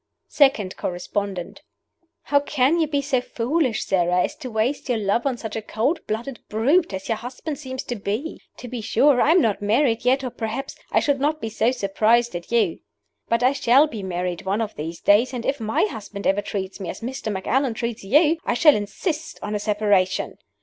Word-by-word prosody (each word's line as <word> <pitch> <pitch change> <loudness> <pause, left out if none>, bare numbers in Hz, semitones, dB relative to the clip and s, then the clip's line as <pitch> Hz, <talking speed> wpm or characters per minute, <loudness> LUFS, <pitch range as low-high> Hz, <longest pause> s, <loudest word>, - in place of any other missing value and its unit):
SECOND 250 -10 +3
CORRESPONDENT: 185 +4 -4 0.6
"How 285 - +3
can 285 +2 +1
you 320 - +2
be 285 -1 -1
so 265 -3 +1
foolish, 250 +1 -1
Sara, 180 -1 +2
as - - -3
to 260 -5 -7
waste 235 +5 -1
your 245 - +2
love 215 +5 0
on 260 -3 -1
such 220 -2 -6
a 225 - -2
cold 225 +9 -1
blooded 235 +4 -4
brute 280 +12 +2
as 190 0 -5
your 225 - 0
husband 265 +5 -6
seems 260 -3 -5
to 245 - -4
be? 215 +9 -4 0.2
To 250 - -8
be 245 -1 -5
sure, 250 +4 +3
I - - +3
am 345 +3 +6
not 210 -3 0
married 225 +3 +2
yet, 260 +2 +2
or 255 - -3
perhaps 225 +4 -4 0.2
I - - +3
should 285 -2 +1
not 300 +3 0
be 225 - -4
so 225 +1 +1
surprised 235 0 +2
at 175 +4 -7
you. 220 -8 +2 0.5
But 230 +1 +1
I 255 +2 +4
shall 270 +1 +5
be 230 -9 -6
married 180 -2 -3
one 195 +3 -1
of 225 -2 -2
these 160 +3 -6
days, 235 +6 +4
and 235 - -4
if 275 - 0
my 220 0 0
husband 210 -2 -7
ever 195 +1 +2
treat 195 -1 -5
me 190 - -5
as - - -7
Mr. 245 -2 -4
Macallan 235 +6 0
treats 235 -2 -4
you, 300 - +4
I - - 0
shall 300 +3 +6
insist 305 - -3
on 210 - -3
a 210 - -1
separation. 205 -3 +1
230 Hz, 205 wpm, -23 LUFS, 205-270 Hz, 0.6 s, am